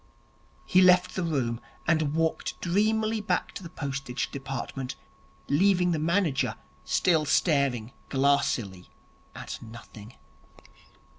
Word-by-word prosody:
He 185 - +4
left 180 0 +5
the 185 - -2
room, 130 -9 -1 0.2
and 155 -3 +1
walked 165 0 -1
dreamily 215 +4 +1
back 210 - -1
to - - -8
the 170 - -8
Postage 135 -4 -4
Department, 135 - -5 0.5
leaving 180 +3 +3
the 160 - 0
manager 165 -3 +1 0.3
still 165 -4 +2
staring 140 -7 +1 0.2
glassily 130 -9 0 0.5
at - - -7
nothing. 110 -1 -12
150 Hz, 105 wpm, -27 LUFS, 135-180 Hz, 0.5 s, left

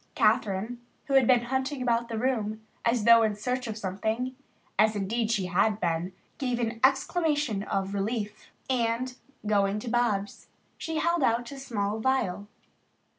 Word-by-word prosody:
Kathryn, 215 +4 +1 0.3
who 275 - -3
had 265 -3 +5
been 245 -2 +5
hunting 265 +3 -2
about 235 -1 0
the 225 - -3
room 220 -3 -1 0.2
as 230 -1 +2
though 230 +1 +8
in 215 -2 +1
search 250 +4 -2
of 220 -1 -4
something, 220 +6 -2 0.4
as 215 0 +4
indeed 215 +3 -1
she 205 -5 +1
had 200 +4 +2
been, 170 0 -1 0.3
gave 250 -3 -1
an 230 -1 -2
exclamation 290 - +2
of 195 -1 -2
relief 210 +1 -3 0.2
and, 245 0 0 0.3
going 200 -1 +2
to 230 +3 -5
Bobs, 215 -5 0 0.3
she 320 -1 -4
held 340 +1 +1
out 235 -1 +1
a 275 - -8
small 215 -5 -2
vial. 220 -6 0
230 Hz, 155 wpm, -28 LUFS, 205-255 Hz, 0.4 s, though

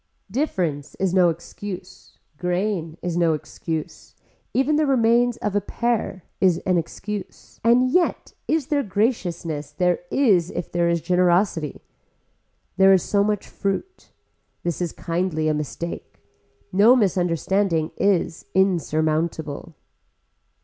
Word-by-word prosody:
Difference 180 - -2
is 190 -2 0
no 180 -2 +5
excuse, 180 +3 -8 0.2
grain 180 -2 -1
is 175 -1 -2
no 170 -2 +3
excuse, 160 +1 -6 0.4
even 270 +4 +2
the 305 0 +2
remains 240 -2 +3
of 210 -3 -3
a 205 - +3
pear 220 -4 -2 0.2
is 185 -3 +4
an 185 -2 +3
excuse 205 +4 -7
and 245 +2 +4
yet 355 +2 +1
is 315 -3 +1
there 285 - +3
graciousness, 180 - -1
there 175 +4 +1
is 195 -11 +3
if 180 - -5
there 170 -1 +1
is 170 -1 +1
generosity. 180 -3 +1 1.0
There 195 0 +7
is 185 - +3
so 200 -1 +2
much 210 -1 -1
fruit. 280 - -4 0.5
This 175 0 -2
is 175 - -1
kindly 165 -2 -1
a 155 - +2
mistake. 150 +3 -5 0.6
No 215 +6 +6
misunderstanding 180 - +1
is 180 -4 0
insurmountable. 160 -3 0
185 Hz, 120 wpm, -23 LUFS, 165-210 Hz, 1.0 s, There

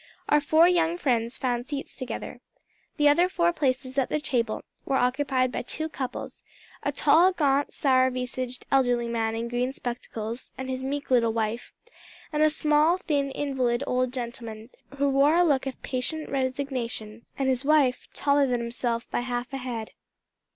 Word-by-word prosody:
Our 295 0 +5
four 315 +4 +5
young 345 -1 +2
friends 240 -6 0
found 245 -1 -1
seats 285 -2 -5
together. 255 -2 -6 0.6
The 295 -1 +4
other 345 +5 +5
four 345 -1 +2
places 260 -3 0
at 260 - 0
their 305 - 0
table 240 -6 -1 0.2
were 275 - -1
occupied 255 0 +1
by - - -2
two 315 +6 -4
couples 260 -4 -6 0.4
a - - -1
tall, 355 +3 +5
gaunt, 285 -5 +1
sour 260 -2 +3
visaged 255 0 -4
elderly 245 -3 +3
man 225 -1 -1
in 230 +1 -3
green 245 +2 -1
spectacles, 235 -2 -6
and 260 0 -4
his 260 0 -3
meek 280 +1 -4
little 230 -3 +4
wife, 225 +1 -2 0.6
and 300 - +1
a 310 - +6
small, 305 +2 +3
thin, 285 -6 0
invalid 265 -3 -1
old 255 -1 0
gentleman, 235 -2 -6 0.3
who 280 +1 +2
wore 280 +3 +4
a 350 - +5
look 280 -5 +2
of 265 - -5
patient 300 +4 -3
resignation, 255 -5 -3
and 270 - 0
his 260 0 +1
wife, 285 -4 +3
taller 280 -1 +3
than 245 -1 0
himself 235 0 -2
by - - 0
half 245 +1 -3
a - - -1
head. 240 -4 -5
260 Hz, 170 wpm, -26 LUFS, 245-290 Hz, 0.6 s, a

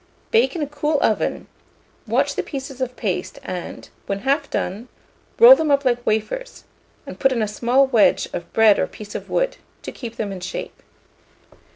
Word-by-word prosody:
Bake 460 -4 +3
in 325 - -2
a - - -3
cool 295 +1 -1
oven; 215 - 0 0.6
watch - - +1
the - - -1
pieces 270 -2 -7
of 255 -1 -2
paste, 185 -5 -3
and, 180 -1 -6 0.2
when 200 0 -3
half 275 +6 0
done, 205 +7 -3 0.5
roll 485 +2 +10
them 320 -9 -1
up 280 -1 +2
like 245 -1 +1
wafers, 220 - -2 0.4
and - - -9
put 270 - +3
in 235 -4 0
a - - -1
small 245 +6 +2
wedge 240 -6 +3
of 175 - -6
bread 220 -2 +5
or - - +1
piece 210 -1 -11
of - - -7
wood, - - 0 0.3
to - - -6
keep 230 -3 -8
them 210 -3 -3
in 190 - -6
shape. 180 - -7
245 Hz, 185 wpm, -21 LUFS, 210-285 Hz, 0.6 s, roll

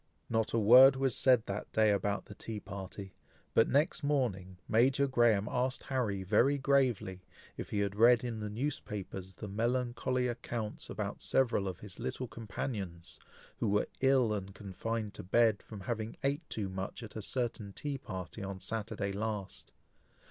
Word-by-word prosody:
Not 115 -1 +1
a - - +1
word 125 +5 +8
was 135 -2 +1
said 125 -4 +4
that 100 +2 -5
day 110 -1 +4
about 100 0 0
the - - -10
tea 110 +1 -6
party, 95 0 -8 0.4
but 115 - +4
next 150 +5 +2
morning, 105 -11 -1
Major 130 +5 +3
Graham 120 -6 +3
asked 125 +1 -1
Harry, 110 -8 -1
very 120 +9 +3
gravely, 130 -9 +1 0.3
"if - - -6
he 100 - 0
had 100 -1 -1
read 115 +2 +6
in 120 -3 -3
the 105 0 -4
newspapers 105 -6 -4
the 105 - -7
melancholy 125 +4 0
accounts 120 -2 -4
about - - -4
several 115 -7 +2
of 95 -3 -5
his 105 -3 -9
little 130 - -3
companions, 100 -5 -5 0.4
who - - 0
were 105 +1 +2
ill 130 -4 +4
and 100 -2 -5
confined 105 +2 -4
to - - -7
bed 110 +2 +3
from 105 -3 -10
having 115 -1 -4
ate 145 +4 -1
too 105 -3 -3
much 95 +4 -5
at 110 - -10
a 110 - -4
certain 115 -3 -2
tea 140 +5 -4
party 95 0 -7
on 95 -1 -5
Saturday 105 -1 -3
last. 105 -1 -4
110 Hz, 165 wpm, -32 LUFS, 100-125 Hz, 0.4 s, word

